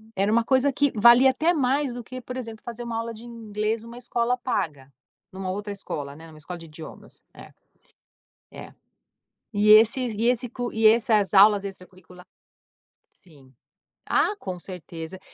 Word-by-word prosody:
era 200 +2 +1
uma 230 +1 +3
coisa 265 +2 +2
que 285 0 +1
valia 240 +4 +7
até 315 +7 +1
mais 275 -2 0
do 245 -1 -7
que, 255 +3 -8
por 250 +2 -8
exemplo, 225 -4 -7
fazer 240 0 -7
uma 235 -1 -4
aula 230 0 -4
de 225 +1 -12
inglês 220 -1 -4
numa 235 +1 -11
escola 245 0 -1
paga, 150 - -4 0.4
numa 190 0 -5
outra 205 +2 -5
escola, 145 -7 -6
né, 160 +2 -13
numa 155 -1 -15
escola 175 +4 -8
de 165 - -11
idiomas. 155 0 -12
É. - - -13 1.0
É. - - -11 0.8
E 210 +1 +2
esses 230 +2 +5
e 220 +3 -1
esse 245 0 +1
co 245 0 -5
e 220 0 +4
essas 215 -3 +3
aulas 200 0 +6
extracurricula 180 -2 -12 0.9
sim. 145 -7 -19 0.6
Ah, 415 - +1
com 185 - -6
certeza. 175 -1 -9
220 Hz, 165 wpm, -24 LUFS, 185-245 Hz, 1.0 s, valia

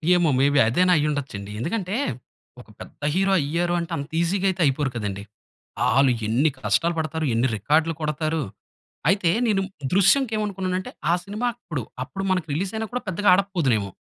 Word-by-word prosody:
ఏమో, 175 -3 +3
మేబి 140 +1 +4
అదైన 180 +11 +3
అయిఉండచ్చు 145 -4 -1
అండి. 100 0 -8
ఎందుకంటే 185 - -2 0.7
ఒక - - -19
పెద్ద - - -12
హీరో 195 +1 +2
అయ్యారు 170 +5 -1
అంటే 170 0 -5
అంత 140 +1 -6
ఈజిగా 185 +3 0
అయితే 185 -1 -2
అయిపోరు 140 0 +1
కదండి. 100 -3 -4 0.7
ఆలు 135 +3 +4 0.2
ఎన్ని 130 +8 +3
కష్టాలు 170 +4 +1
పడతారు. 160 0 -2
ఎన్ని 115 +3 +2
రికార్డ్లు 155 - +2
కొడతారు. 155 +1 -1 0.7
అయితే 190 -2 +3 0.2
నేను 205 -4 +2 0.3
'దృశ్యం‌కి' 215 +6 +4
ఏమనుకున్నాను 190 -3 -2
అంటే, 185 - -6 0.2
ఆ - - +4
సినిమా 210 +5 -3
అప్పుడు 165 - -5 0.2
అప్పుడు 135 +10 -5
మనకు 185 -3 0
రిలీజ్ 185 +6 -2
అయినా 220 0 -2
కూడా 250 0 -2
పెద్దగా 190 +3 0
ఆడకపోదునేమో. 170 - +1
165 Hz, 165 wpm, -24 LUFS, 140-195 Hz, 0.7 s, మేబి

